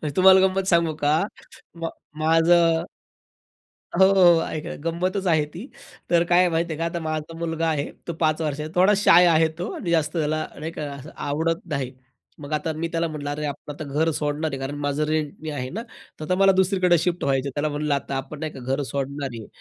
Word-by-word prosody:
तुम्हाला 190 Hz, 0 st, +7 dB
गंमत 190 Hz, 0 st, -2 dB
सांगू 170 Hz, -3 st, +3 dB
का? 145 Hz, +1 st, +3 dB, 0.7 s
मा 165 Hz, -, -1 dB, 0.3 s
माझं 165 Hz, +1 st, +4 dB, 1.2 s
हो, 190 Hz, -, +8 dB
हो, 175 Hz, -4 st, +6 dB
ऐक, 155 Hz, -, -5 dB
ऐका. -, -, -5 dB
गंमतच 185 Hz, +3 st, -2 dB
आहे 155 Hz, -3 st, +3 dB
ती. 205 Hz, +11 st, -8 dB, 0.4 s
तर 170 Hz, -1 st, +4 dB
काय 175 Hz, +1 st, +4 dB
आहे 180 Hz, -1 st, +4 dB
माहिती 165 Hz, +1 st, -1 dB
आहे -, -, -7 dB
का. 165 Hz, -, 0 dB
आता 170 Hz, 0 st, -2 dB
माझा 155 Hz, +1 st, -4 dB
मुलगा 165 Hz, -1 st, -1 dB
आहे 150 Hz, -2 st, 0 dB, 0.2 s
तो 170 Hz, -, -2 dB
5 155 Hz, 0 st, +2 dB
वर्षांचा; 150 Hz, 0 st, -3 dB
थोडा 185 Hz, +3 st, +5 dB
शाय 180 Hz, -3 st, +7 dB
आहे 160 Hz, -1 st, +4 dB
तो 180 Hz, -, -3 dB
आणि 170 Hz, -, -4 dB
जास्त 155 Hz, -2 st, +1 dB
त्याला 155 Hz, 0 st, 0 dB
नाही 160 Hz, +2 st, -4 dB
का, 155 Hz, -, -6 dB
असं 140 Hz, +2 st, -10 dB
आवडत 165 Hz, +3 st, -1 dB
नाही. 130 Hz, -3 st, -2 dB, 0.5 s
मग 145 Hz, +1 st, -7 dB
आता 155 Hz, +1 st, -1 dB
मी 165 Hz, +2 st, -3 dB
त्याला 165 Hz, 0 st, 0 dB
म्हटलं, 150 Hz, -2 st, -5 dB
"अरे 150 Hz, +1 st, -3 dB
आपण 145 Hz, 0 st, -6 dB
आता 155 Hz, -, -7 dB
घर 150 Hz, +3 st, 0 dB
सोडणार 150 Hz, +1 st, -1 dB
आहे; 135 Hz, -, -4 dB
कारण 135 Hz, +2 st, -4 dB
माझं 145 Hz, +2 st, 0 dB
रेंटनी 155 Hz, 0 st, -3 dB
आहे 130 Hz, -4 st, -4 dB
ना 220 Hz, +9 st, -5 dB, 0.4 s
तर 155 Hz, -, -6 dB
आता 180 Hz, +4 st, +1 dB
मला 195 Hz, 0 st, +5 dB
दुसरीकडे 185 Hz, -2 st, +3 dB
शिफ्ट 175 Hz, +2 st, -1 dB
व्हायचं 135 Hz, 0 st, +1 dB
आहे." -, -, -4 dB
त्याला 150 Hz, +1 st, 0 dB
म्हणलं, 150 Hz, 0 st, -1 dB
"आता 140 Hz, 0 st, -4 dB
आपण 135 Hz, +2 st, -5 dB
नाही 155 Hz, 0 st, -4 dB
का -, -, -10 dB
घर 135 Hz, +3 st, -2 dB
सोडणार 140 Hz, 0 st, -3 dB
आहे." 110 Hz, -2 st, -8 dB
155 Hz, 215 wpm, -24 LUFS, 145-170 Hz, 1.2 s, हो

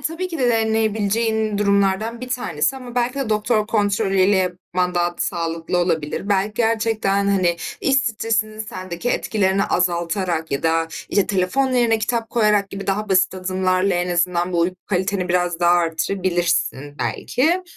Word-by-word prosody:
tabii 345 Hz, +3 st, -3 dB
ki 330 Hz, -, -5 dB
de 250 Hz, -2 st, +2 dB
deneyebileceğin 220 Hz, -1 st, 0 dB
durumlardan 200 Hz, +3 st, +1 dB
bir 255 Hz, -, -6 dB
tanesi. 245 Hz, -, -1 dB
Ama 250 Hz, -2 st, -9 dB
belki 245 Hz, +1 st, 0 dB
de 275 Hz, -4 st, -3 dB
doktor 215 Hz, 0 st, +1 dB
kontrolü 205 Hz, -2 st, +1 dB
ile 195 Hz, +1 st, +4 dB
yapman 180 Hz, 0 st, -1 dB
daha 175 Hz, 0 st, 0 dB
sağlıklı 165 Hz, 0 st, -2 dB
olabilir. 170 Hz, +2 st, -1 dB
Belki, 200 Hz, +1 st, +1 dB
gerçekten, 220 Hz, -3 st, +1 dB
hani, 180 Hz, -3 st, +2 dB, 0.2 s
iş 270 Hz, -, +2 dB
stresinin 225 Hz, -4 st, 0 dB
sendeki 185 Hz, 0 st, -4 dB
etkilerini 195 Hz, -2 st, +1 dB
azaltarak 175 Hz, -1 st, -1 dB
ya 140 Hz, -, -2 dB
da, 165 Hz, 0 st, +1 dB, 0.2 s
işte, 200 Hz, -, +2 dB
telefon 210 Hz, +8 st, 0 dB
yerine 235 Hz, -3 st, +3 dB
kitap 230 Hz, 0 st, -2 dB
koyarak 210 Hz, -4 st, +2 dB
gibi 195 Hz, 0 st, -7 dB
daha 205 Hz, +2 st, -1 dB
basit 190 Hz, -1 st, +3 dB
adımlarla 185 Hz, 0 st, 0 dB
en 175 Hz, 0 st, -1 dB
azından 175 Hz, +1 st, 0 dB
bu 170 Hz, -, +1 dB
uyku 180 Hz, +2 st, 0 dB
kaliteni 190 Hz, -1 st, -1 dB
biraz 175 Hz, -1 st, 0 dB
daha 175 Hz, -, +4 dB
artırabilirsin, 170 Hz, -4 st, 0 dB
belki. 335 Hz, +8 st, 0 dB
195 Hz, 150 wpm, -21 LUFS, 180-225 Hz, 0.2 s, ile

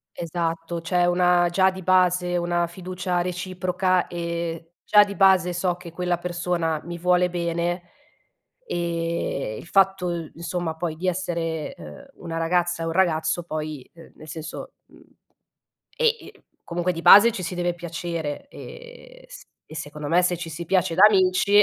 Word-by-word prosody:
Esatto, 165 Hz, 0 st, -3 dB
c'è 175 Hz, +1 st, +1 dB
una 175 Hz, 0 st, +3 dB
già 190 Hz, +2 st, +3 dB
di 190 Hz, 0 st, -9 dB
base, 180 Hz, -1 st, +2 dB
una 175 Hz, 0 st, 0 dB
fiducia 180 Hz, 0 st, -3 dB
reciproca. 185 Hz, 0 st, -1 dB
Ehm, 170 Hz, -1 st, -4 dB, 0.2 s
già 210 Hz, 0 st, +6 dB
di 200 Hz, 0 st, -7 dB
base 185 Hz, -2 st, +4 dB
so 180 Hz, 0 st, 0 dB
che 175 Hz, -1 st, -11 dB
quella 175 Hz, +1 st, -1 dB
persona 175 Hz, -2 st, -2 dB
mi 170 Hz, 0 st, -6 dB
vuole 180 Hz, +1 st, +2 dB
bene. 175 Hz, 0 st, -2 dB, 0.8 s
Ehm, 170 Hz, -8 st, -2 dB
il -, -, -11 dB
fatto 180 Hz, -4 st, +1 dB
insomma 170 Hz, -1 st, -4 dB
poi 160 Hz, -1 st, -3 dB
di 185 Hz, +3 st, -2 dB
essere, 170 Hz, -3 st, -2 dB
uhm, 75 Hz, -1 st, -11 dB, 0.2 s
una 165 Hz, 0 st, -4 dB
ragazza 175 Hz, +1 st, 0 dB
e -, -, -2 dB
un 165 Hz, -, -2 dB
ragazzo 165 Hz, -2 st, +1 dB
poi, 155 Hz, -4 st, -5 dB
uhm, 165 Hz, -1 st, -15 dB
nel 155 Hz, -, -13 dB
senso, 160 Hz, 0 st, -7 dB
mhmm, -, -, -20 dB, 0.9 s
e 485 Hz, -, -1 dB, 0.2 s
i -, -, -12 dB, 0.3 s
comunque 175 Hz, +1 st, -1 dB
di 165 Hz, -, -6 dB
base, 220 Hz, +3 st, +9 dB
ci 190 Hz, -, -5 dB
si 180 Hz, +1 st, -4 dB
deve 175 Hz, 0 st, -1 dB
piacere, 170 Hz, -, -5 dB
ehm, -, -, -12 dB
s -, -, -13 dB, 0.2 s
e 155 Hz, -, -12 dB
secondo 150 Hz, 0 st, -6 dB
me, 175 Hz, +2 st, +4 dB
se 180 Hz, 0 st, +1 dB
ci 165 Hz, -1 st, -7 dB
si 170 Hz, +2 st, -6 dB
piace 180 Hz, -2 st, +1 dB
da -, -, +3 dB
amici 200 Hz, +1 st, +4 dB
175 Hz, 160 wpm, -24 LUFS, 165-180 Hz, 0.9 s, base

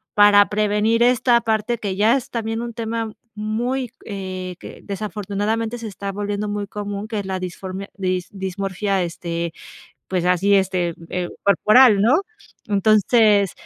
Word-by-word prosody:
para 205 Hz, -1 st, +6 dB
prevenir 210 Hz, +2 st, +2 dB
esta 245 Hz, 0 st, +4 dB
parte, 220 Hz, +1 st, 0 dB
que 200 Hz, -4 st, -3 dB
ya 215 Hz, +5 st, +4 dB
es 260 Hz, -, -7 dB
también 225 Hz, -1 st, -2 dB
un 235 Hz, -1 st, -5 dB
tema 225 Hz, -1 st, -3 dB, 0.2 s
muy, 235 Hz, +4 st, -2 dB
eh, 185 Hz, -3 st, -5 dB
que -, -, -10 dB
desafortunadamente 210 Hz, +3 st, -3 dB
se 230 Hz, -2 st, -6 dB
está 200 Hz, 0 st, -5 dB
volviendo 205 Hz, +1 st, -3 dB
muy 205 Hz, 0 st, -3 dB
común, 205 Hz, 0 st, -5 dB
que 215 Hz, -2 st, -3 dB
es 200 Hz, -, -5 dB
la 190 Hz, -1 st, -2 dB
disformia 185 Hz, +2 st, -6 dB
dis 185 Hz, -2 st, -2 dB
dismorfia, 195 Hz, 0 st, -2 dB
este 170 Hz, -1 st, -4 dB, 0.6 s
pues, 180 Hz, -2 st, -1 dB
así, 180 Hz, +3 st, +3 dB
este 180 Hz, -3 st, +1 dB, 0.2 s
eh, 180 Hz, -1 st, -2 dB
corporal, 210 Hz, +3 st, +5 dB
¿no? 260 Hz, -, +4 dB, 0.5 s
Entonces, 210 Hz, -1 st, +4 dB
205 Hz, 145 wpm, -21 LUFS, 190-220 Hz, 0.6 s, para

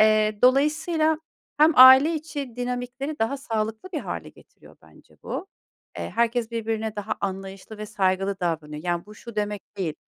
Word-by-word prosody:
Eee, 215 Hz, -1 st, +4 dB
dolayısıyla 310 Hz, +4 st, +3 dB, 0.4 s
hem 310 Hz, +2 st, +6 dB
aile 265 Hz, +5 st, +9 dB
içi 290 Hz, -5 st, -6 dB
dinamikleri 250 Hz, +4 st, -4 dB
daha 225 Hz, +5 st, 0 dB
sağlıklı 225 Hz, 0 st, -3 dB
bir 310 Hz, -, -2 dB
hâle -, -, -6 dB
getiriyor -, -, -19 dB
bence -, -, -21 dB
bu. 385 Hz, -, -5 dB, 0.5 s
Eee, -, -, -5 dB
herkes 235 Hz, 0 st, +1 dB
birbirine 220 Hz, -1 st, -3 dB
daha 215 Hz, +1 st, -3 dB
anlayışlı 195 Hz, +2 st, -6 dB
ve 215 Hz, -, -5 dB
saygılı 195 Hz, -1 st, 0 dB
davranıyor. 155 Hz, -3 st, -3 dB
Yani 175 Hz, +1 st, -2 dB
bu 210 Hz, -, -12 dB
şu 230 Hz, +1 st, -12 dB
demek 210 Hz, -1 st, -4 dB
değil. 170 Hz, -6 st, -2 dB
225 Hz, 155 wpm, -24 LUFS, 205-270 Hz, 0.5 s, aile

